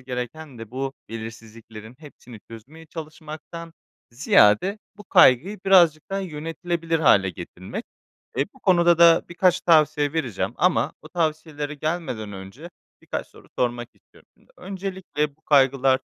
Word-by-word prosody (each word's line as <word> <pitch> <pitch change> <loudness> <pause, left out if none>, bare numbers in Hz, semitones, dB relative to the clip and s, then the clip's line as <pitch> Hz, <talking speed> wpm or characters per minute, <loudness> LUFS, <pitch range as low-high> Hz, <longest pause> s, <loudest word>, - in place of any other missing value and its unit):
gereken 130 +2 -7
de 115 -1 -9
bu 135 +1 -4 0.2
belirsizliklerin 115 0 -10
hepsini 125 -7 -14
çözmeye 140 +9 -13
çalışmaktan 160 +1 -9 0.4
ziyade 155 - +3 0.2
bu 210 - -13
kaygıyı 170 - +4
birazcık 170 -5 +5
daha 195 - -1
yönetilebilir 165 0 -3
hâle 100 -11 +4
getirmek. 90 - -8 0.5
Eee, - - +1
bu 265 - -20
konuda 175 -3 +4
da 170 -1 +6
birkaç 180 +1 +2
tavsiye 150 -3 +3
vereceğim 135 -10 -2
ama - - +1
bu - - -12
tavsiyelere 155 -3 -3
gelmeden 145 -9 -4
önce 100 - -10 0.3
birkaç - - -5
soru - - -18
sormak 120 -1 -1
istiyorum - - -25
şimdi. - - -29
Öncelikle 185 -6 -4
bu 160 - -38
kaygılar 135 -2 +3
150 Hz, 130 wpm, -23 LUFS, 120-170 Hz, 0.5 s, da